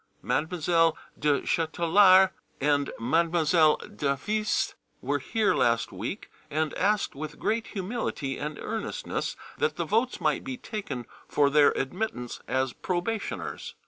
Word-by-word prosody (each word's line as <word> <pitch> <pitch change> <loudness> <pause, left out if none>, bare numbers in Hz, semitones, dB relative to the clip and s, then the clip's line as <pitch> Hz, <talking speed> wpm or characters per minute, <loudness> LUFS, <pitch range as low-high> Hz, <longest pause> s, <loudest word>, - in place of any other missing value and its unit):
Mademoiselle 165 0 +2 0.2
du 145 -1 +2
Châtelard 185 +3 +5 0.3
and 145 0 +2
Mademoiselle 160 +4 +3
d'Avise 210 +10 -1 0.3
were - - -1
here 220 -2 +1
last 115 -1 +2
week, - - -5 0.2
and 155 0 -1
asked 210 0 +1
with 150 +2 -7
great 225 +1 -1
humility 190 - -3
and 150 0 -4
earnestness 220 -1 -3 0.2
that 465 0 +1
the - - -2
votes 235 +4 +1
might - - +1
be 260 0 -5
taken 195 - -5 0.2
for 145 -1 +3
their 150 0 +6
admittance 135 - -3
as 130 -1 0
probationers. 195 +4 -3
165 Hz, 120 wpm, -27 LUFS, 145-210 Hz, 0.3 s, their